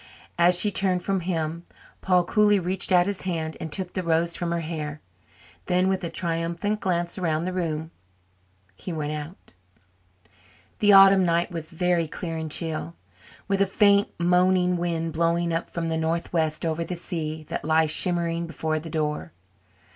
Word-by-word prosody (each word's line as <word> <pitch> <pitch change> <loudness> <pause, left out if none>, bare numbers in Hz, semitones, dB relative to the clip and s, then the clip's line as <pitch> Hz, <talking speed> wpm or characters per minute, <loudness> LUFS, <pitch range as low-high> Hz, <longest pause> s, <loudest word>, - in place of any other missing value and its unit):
As 175 +1 +5
she 210 - +3
turned 185 -2 +1
from 195 -1 0
him, 165 -2 -3 0.4
Paul 180 -1 +3
coolly 210 +3 +3
reached 185 +1 0
out 175 -1 +5
his 200 0 -3
hand 160 -4 -3
and 160 - -6
took 180 +3 -3
the 185 - -2
rose 170 0 +1
from 175 -1 -2
her 170 0 -1
hair; 155 -2 -5 0.7
then, 180 +1 +2
with 190 -1 -1
a 170 - -2
triumphant 170 +5 -2
glance 175 -2 -1
around 160 -3 0
the 185 - -3
room, 160 -3 -3 0.8
he 180 - -7
went 150 -2 -3
out. 150 - -9 1.3
The 205 -1 +5
autumn 195 0 +8
night 170 0 +1
was 165 -2 -4
very 175 -1 0
clear 165 +1 -5
and 160 -1 -4
chill, 165 +1 -2 0.5
with 195 -1 0
a 195 - +3
faint, 200 +1 +3
moaning 180 +1 +3
wind 165 -2 -2
blowing 170 +1 +1
up 165 - -2
from 170 -1 -3
the 160 0 -1
northwest 160 -1 -1
over 165 +1 -1
the 180 - -4
sea 160 -3 -5
that - - -4
lay 160 +1 +3
shimmering 170 +1 +1
before 160 -1 -2
the 165 +1 -9
door. 150 - -3
170 Hz, 170 wpm, -25 LUFS, 160-180 Hz, 1.3 s, autumn